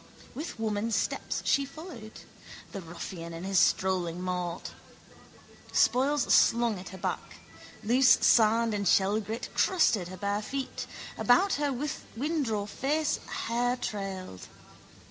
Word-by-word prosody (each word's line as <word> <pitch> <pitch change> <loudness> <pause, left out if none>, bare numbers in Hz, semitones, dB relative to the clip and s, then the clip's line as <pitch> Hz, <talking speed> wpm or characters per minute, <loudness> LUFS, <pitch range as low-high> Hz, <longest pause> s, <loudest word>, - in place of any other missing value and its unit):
With 300 +1 -6
woman 215 0 -1
steps 225 - -1
she 280 - +3
followed: 275 -6 -10 0.5
the 195 - -6
ruffian 170 0 -7
and 165 +2 -6
his 195 -1 +2
strolling 180 -2 +1
mort. 180 -1 -3 1.0
Spoils 270 +2 +3
slung 235 -4 +4
at 185 - -9
her 190 - -9
back. - - -4 0.5
Loose 250 +3 +5
sand 225 0 +4
and 200 -1 -1
shellgrit 210 +4 +1
crusted 230 - +2
her 185 +1 -8
bare 200 +2 -1
feet. 270 +4 -4 0.3
About 370 +11 +4
her 290 -1 +1 0.5
windraw 255 -8 -1
face 290 +8 0 0.3
hair 245 +2 0
trailed. 190 - -5
215 Hz, 120 wpm, -29 LUFS, 190-255 Hz, 1.0 s, Loose